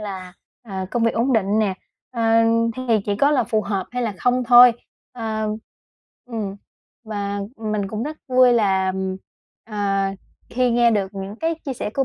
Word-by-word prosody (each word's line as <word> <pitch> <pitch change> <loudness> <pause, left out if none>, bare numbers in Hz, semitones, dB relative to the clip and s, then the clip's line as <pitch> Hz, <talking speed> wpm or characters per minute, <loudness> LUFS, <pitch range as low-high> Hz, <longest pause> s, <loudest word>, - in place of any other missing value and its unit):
là, 190 -3 -7 0.3
à, 190 -4 -5
công 240 - -1
việc 230 - +1
ổn 245 +4 +1
định 210 -1 +2
nè, 200 -3 +1 0.4
ờ, 235 -2 -3 0.5
thì 255 - -4 0.2
chỉ 205 -1 -1
có 280 +7 +3
là 260 -6 +2
phù 215 0 0
hợp 195 -2 -3
hay 250 0 -2
là 225 -3 -1
không 250 +4 +1
thôi. 245 0 +8 0.4
Ờ 220 -3 -3 0.8
ừm, 215 -5 -5 0.5
và 205 -2 -3 0.2
mình 215 -3 -2
cũng 215 +2 -4
rất 305 +4 -5
vui 255 -1 +5
là, 190 -5 +2 0.7
à, 195 -3 -1 0.3
khi 250 0 +1
nghe 235 0 +4
được 200 -2 -1
những 195 +2 -6
cái 325 +3 -1
chia 270 - -3
sẻ 210 - -4
của 270 - +1
220 Hz, 175 wpm, -21 LUFS, 200-245 Hz, 0.8 s, thôi